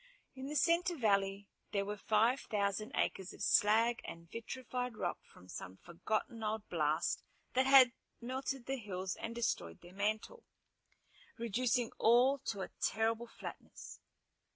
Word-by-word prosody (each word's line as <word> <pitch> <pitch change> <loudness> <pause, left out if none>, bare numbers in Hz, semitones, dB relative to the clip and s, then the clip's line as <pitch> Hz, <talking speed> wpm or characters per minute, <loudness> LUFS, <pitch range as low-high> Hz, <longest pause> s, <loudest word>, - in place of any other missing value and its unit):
In 265 0 -7
the 300 - -4
center 340 +2 +3
valley 200 -4 +1 0.3
there 200 -1 +1
were 205 +1 -3
five 220 +5 +3
thousand 205 0 0
acres 190 -1 -1
of - - -7
slag 225 +4 +4
and 170 0 -9
vitrified 245 0 -4
rock 175 - -2
from 90 - -18
some 95 0 -8
forgotten 215 - -3
old 215 0 -2
blast 155 -1 +1 0.3
that 260 +1 +3
had 265 -2 +8 0.3
melted 260 +1 -3
the 270 0 -2
hills 190 -4 -4
and 230 +1 -6
destroyed 85 - -2
their 175 - -13
mantle, 215 - -2 0.9
reducing 235 +1 0
all 250 +5 +5
to 200 -3 -2
a - - -5
terrible 225 +2 +1
flatness. - - -9
220 Hz, 140 wpm, -35 LUFS, 200-250 Hz, 0.9 s, had